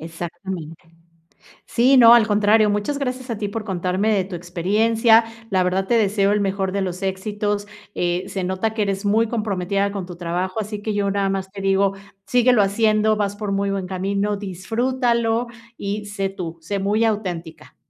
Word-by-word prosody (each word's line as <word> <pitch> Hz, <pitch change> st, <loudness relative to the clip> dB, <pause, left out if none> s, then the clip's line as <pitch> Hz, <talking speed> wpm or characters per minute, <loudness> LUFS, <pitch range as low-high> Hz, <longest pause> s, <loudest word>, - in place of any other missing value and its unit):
Exactamente, 165 Hz, 0 st, -7 dB, 0.7 s
sí, 255 Hz, +4 st, +3 dB
no, 235 Hz, -2 st, +9 dB
al 235 Hz, -3 st, +5 dB
contrario, 210 Hz, +1 st, +4 dB
muchas 205 Hz, +8 st, -1 dB
gracias 255 Hz, -1 st, -4 dB
a 230 Hz, -, -2 dB
ti 205 Hz, -1 st, -3 dB
por 215 Hz, +2 st, -4 dB
contarme 190 Hz, +2 st, 0 dB
de 195 Hz, -3 st, +1 dB
tu 185 Hz, -2 st, -7 dB
experiencia, 220 Hz, +7 st, +3 dB, 0.3 s
la 185 Hz, -2 st, +2 dB
verdad 190 Hz, +1 st, 0 dB
te -, -, +1 dB
deseo 200 Hz, -1 st, +2 dB
el 210 Hz, -, +1 dB
mejor 195 Hz, -1 st, -1 dB
de 200 Hz, -, 0 dB
los 185 Hz, 0 st, -4 dB
éxitos, 205 Hz, +2 st, -2 dB, 0.3 s
eh, 175 Hz, +1 st, -1 dB
se 190 Hz, -, -4 dB
nota 190 Hz, +4 st, -1 dB
que 220 Hz, -, -2 dB
eres 200 Hz, 0 st, -1 dB
muy 220 Hz, +3 st, +3 dB
comprometida 200 Hz, -3 st, -1 dB
con 195 Hz, -3 st, -4 dB
tu 175 Hz, -1 st, -10 dB
trabajo, 180 Hz, +3 st, -2 dB
así 210 Hz, 0 st, -4 dB
que 215 Hz, 0 st, -2 dB
yo 200 Hz, -1 st, 0 dB
nada 195 Hz, 0 st, 0 dB
más 190 Hz, 0 st, -3 dB
te 195 Hz, -, -7 dB
digo, 195 Hz, 0 st, +2 dB, 0.3 s
síguelo 245 Hz, -2 st, +4 dB
haciendo, 215 Hz, +1 st, +2 dB
vas 205 Hz, -1 st, -2 dB
por 205 Hz, -2 st, -3 dB
muy 195 Hz, 0 st, 0 dB
buen 195 Hz, -2 st, -3 dB
camino, 200 Hz, +2 st, -1 dB
disfrútalo 235 Hz, +4 st, -1 dB, 0.3 s
y 205 Hz, +1 st, -3 dB
sé 195 Hz, -1 st, -2 dB
tú, 180 Hz, -4 st, -6 dB
sé 195 Hz, +5 st, -3 dB
muy 210 Hz, +4 st, +1 dB
auténtica. 175 Hz, -7 st, -4 dB
200 Hz, 180 wpm, -21 LUFS, 190-215 Hz, 0.7 s, no